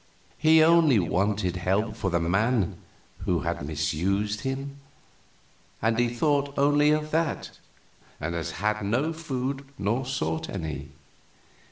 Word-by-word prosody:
"He 160 Hz, +1 st, +6 dB
only 160 Hz, -6 st, +5 dB
wanted 95 Hz, 0 st, 0 dB
help 100 Hz, +5 st, 0 dB
for 100 Hz, -3 st, -2 dB
the 85 Hz, -1 st, +1 dB
man 95 Hz, +4 st, +1 dB, 0.4 s
who -, -, 0 dB
had -, -, -3 dB
misused 90 Hz, +8 st, -1 dB
him, 135 Hz, +1 st, -4 dB, 1.0 s
and 115 Hz, +1 st, +1 dB
he 120 Hz, 0 st, +3 dB
thought 140 Hz, +2 st, 0 dB
only 145 Hz, +1 st, +4 dB
of 155 Hz, 0 st, +1 dB
that, 160 Hz, -1 st, -1 dB, 0.6 s
and 85 Hz, +3 st, -3 dB
has 85 Hz, -1 st, -3 dB
had 105 Hz, +1 st, -1 dB
no 125 Hz, +11 st, 0 dB
food 135 Hz, -3 st, -3 dB
nor 110 Hz, +6 st, 0 dB
sought 80 Hz, -11 st, -2 dB
any. 75 Hz, -6 st, -5 dB
110 Hz, 130 wpm, -26 LUFS, 90-140 Hz, 1.0 s, He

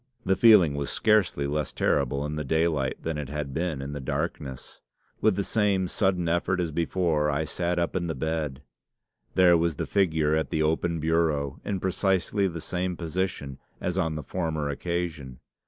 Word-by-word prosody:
The 95 Hz, -, +3 dB
feeling 105 Hz, -10 st, +6 dB
was 70 Hz, -1 st, -3 dB
scarcely 105 Hz, -9 st, +2 dB
less 75 Hz, 0 st, -2 dB
terrible 70 Hz, +3 st, 0 dB
in 75 Hz, +1 st, -3 dB
the 75 Hz, -, -2 dB
daylight 75 Hz, -2 st, +1 dB
than 80 Hz, -2 st, -2 dB
it 70 Hz, -2 st, -5 dB
had 75 Hz, -2 st, -4 dB
been 80 Hz, -4 st, -2 dB
in 70 Hz, +1 st, -5 dB
the 70 Hz, -, -4 dB
darkness. 65 Hz, 0 st, -4 dB, 0.4 s
With 110 Hz, -3 st, +3 dB
the 100 Hz, -, 0 dB
same 100 Hz, -3 st, +1 dB
sudden 90 Hz, -2 st, 0 dB
effort 85 Hz, +2 st, +1 dB
as 85 Hz, -3 st, -1 dB
before, 80 Hz, -2 st, +1 dB
I 75 Hz, +2 st, 0 dB
sat 85 Hz, +3 st, -2 dB
up 85 Hz, +1 st, -1 dB
in 85 Hz, -2 st, -1 dB
the 80 Hz, -, -2 dB
bed. 75 Hz, -1 st, -3 dB, 0.7 s
There 90 Hz, -2 st, +6 dB
was 85 Hz, -1 st, 0 dB
the -, -, -3 dB
figure 80 Hz, -6 st, +2 dB
at 80 Hz, -, 0 dB
the 80 Hz, -, 0 dB
open 80 Hz, +2 st, 0 dB
bureau, 80 Hz, -3 st, 0 dB
in 100 Hz, -2 st, -2 dB
precisely 95 Hz, +1 st, +1 dB
the 85 Hz, -3 st, -5 dB
same 90 Hz, +1 st, -2 dB
position 85 Hz, -5 st, -3 dB, 0.2 s
as 90 Hz, -, -2 dB
on 80 Hz, -4 st, 0 dB
the 75 Hz, -, -5 dB
former 80 Hz, -5 st, -2 dB
occasion. 80 Hz, -4 st, -3 dB
80 Hz, 180 wpm, -27 LUFS, 75-90 Hz, 0.7 s, feeling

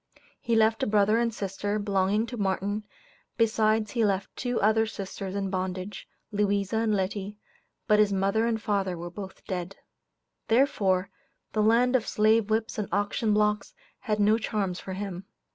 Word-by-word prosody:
He 230 Hz, -1 st, 0 dB
left 225 Hz, 0 st, +3 dB
a -, -, +1 dB
brother 210 Hz, +1 st, +3 dB
and 235 Hz, -1 st, +1 dB
sister, 205 Hz, 0 st, -3 dB
belonging 200 Hz, +1 st, +1 dB
to 240 Hz, +1 st, -7 dB
Martin, 200 Hz, +1 st, -1 dB, 0.5 s
besides 220 Hz, -1 st, +2 dB
he 235 Hz, -2 st, +1 dB
left 195 Hz, -2 st, 0 dB
two 245 Hz, -2 st, -2 dB
other 220 Hz, +2 st, +3 dB
sisters 195 Hz, -2 st, -6 dB
in 195 Hz, -1 st, -2 dB
bondage, 185 Hz, +1 st, -4 dB, 0.2 s
Louisa 205 Hz, 0 st, 0 dB
and 220 Hz, -1 st, +1 dB
Letty, 200 Hz, +1 st, -3 dB, 0.5 s
but 210 Hz, 0 st, +4 dB
his 210 Hz, -1 st, +5 dB
father 200 Hz, +3 st, +1 dB
and 225 Hz, -1 st, 0 dB
mother 195 Hz, -4 st, 0 dB
were 175 Hz, +1 st, -6 dB
both 190 Hz, +1 st, -9 dB
dead. 185 Hz, 0 st, -4 dB, 0.7 s
Therefore, 200 Hz, -7 st, +2 dB, 0.4 s
the 215 Hz, -, +1 dB
land 235 Hz, +4 st, +4 dB
of 240 Hz, -, +1 dB
slave 215 Hz, 0 st, +3 dB
whips 220 Hz, 0 st, -1 dB
and 205 Hz, -, -2 dB
auction 205 Hz, +3 st, 0 dB
blocks 210 Hz, 0 st, +1 dB, 0.2 s
had 210 Hz, -1 st, -2 dB
no 210 Hz, +2 st, +4 dB
charms 200 Hz, -5 st, -2 dB
for 190 Hz, -, -6 dB
him. 190 Hz, -1 st, -5 dB
210 Hz, 160 wpm, -27 LUFS, 195-220 Hz, 0.7 s, his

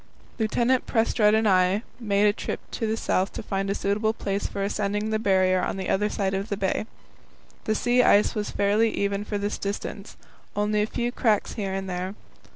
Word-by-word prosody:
Lieutenant 240 Hz, +3 st, +1 dB
Prestrud 220 Hz, -2 st, +3 dB
and 220 Hz, 0 st, +2 dB
I 185 Hz, +2 st, +3 dB, 0.2 s
made 205 Hz, -3 st, +2 dB
a 205 Hz, -, +4 dB
trip -, -, -4 dB
to 225 Hz, -, -2 dB
the 220 Hz, +1 st, -1 dB
south 190 Hz, -3 st, 0 dB
to -, -, -6 dB
find 195 Hz, -1 st, -2 dB
a 200 Hz, -, 0 dB
suitable 215 Hz, +3 st, 0 dB
place 200 Hz, -2 st, -2 dB
for 200 Hz, -, -4 dB
ascending 210 Hz, +1 st, -1 dB
the 215 Hz, -, +1 dB
Barrier 185 Hz, -3 st, +3 dB
on -, -, -2 dB
the 190 Hz, -, -3 dB
other 210 Hz, +2 st, +1 dB
side 195 Hz, -2 st, -1 dB
of 195 Hz, +3 st, -2 dB
the 200 Hz, -, -2 dB
bay. 195 Hz, +2 st, -1 dB, 0.8 s
The 215 Hz, -, +1 dB
sea 245 Hz, +3 st, +3 dB
ice 210 Hz, -4 st, +4 dB
was 210 Hz, -2 st, -2 dB
fairly 205 Hz, +3 st, +2 dB
even 200 Hz, -1 st, -1 dB
for 210 Hz, 0 st, -3 dB
this 205 Hz, +1 st, -3 dB
distance; 200 Hz, 0 st, -5 dB, 0.4 s
only 210 Hz, +1 st, +1 dB
a 210 Hz, -, +1 dB
few 240 Hz, +1 st, -2 dB
cracks 220 Hz, -4 st, +1 dB
here 195 Hz, -3 st, -3 dB
and 195 Hz, 0 st, -4 dB
there. 185 Hz, +2 st, -4 dB
205 Hz, 200 wpm, -25 LUFS, 195-220 Hz, 0.8 s, a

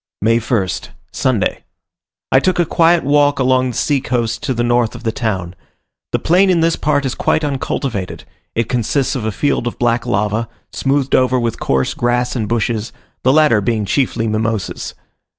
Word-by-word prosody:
May 115 Hz, +3 st, +3 dB
1st. 110 Hz, -5 st, -2 dB, 0.2 s
Sunday. 120 Hz, -7 st, 0 dB, 0.7 s
I 130 Hz, -, +6 dB
took 185 Hz, +6 st, +1 dB
a 175 Hz, -, +3 dB
quiet 165 Hz, +1 st, +3 dB
walk 145 Hz, +1 st, +3 dB
along 130 Hz, -1 st, +2 dB
the 120 Hz, -, -5 dB
sea 145 Hz, -3 st, +1 dB
coast 120 Hz, -3 st, -1 dB
to 145 Hz, -3 st, -1 dB
the 120 Hz, -, 0 dB
north 120 Hz, -1 st, +1 dB
of 120 Hz, -, -10 dB
the 110 Hz, -, 0 dB
town. 95 Hz, -7 st, -3 dB, 0.6 s
The -, -, +2 dB
plain 185 Hz, +4 st, +3 dB
in 175 Hz, -3 st, +3 dB
this 165 Hz, 0 st, +2 dB
part 145 Hz, -2 st, 0 dB
is 130 Hz, -, -1 dB
quite 160 Hz, -, 0 dB
uncultivated; 130 Hz, -8 st, -3 dB, 0.3 s
it 115 Hz, -1 st, 0 dB
consists 125 Hz, +3 st, 0 dB
of 120 Hz, -5 st, -3 dB
a 110 Hz, -, 0 dB
field 140 Hz, +1 st, 0 dB
of 120 Hz, -, -4 dB
black 120 Hz, 0 st, 0 dB
lava, 105 Hz, +3 st, 0 dB, 0.2 s
smoothed 135 Hz, 0 st, 0 dB
over 130 Hz, 0 st, +3 dB
with 115 Hz, -2 st, -2 dB
coarse 65 Hz, -1 st, 0 dB
grass 120 Hz, +1 st, 0 dB
and 110 Hz, -4 st, -2 dB
bushes, 115 Hz, -1 st, -1 dB, 0.3 s
the 130 Hz, -, +3 dB
latter 150 Hz, -7 st, +4 dB
being 110 Hz, +1 st, 0 dB
chiefly 115 Hz, +2 st, 0 dB
Mimosas. 110 Hz, -1 st, -2 dB
120 Hz, 180 wpm, -17 LUFS, 110-140 Hz, 0.7 s, I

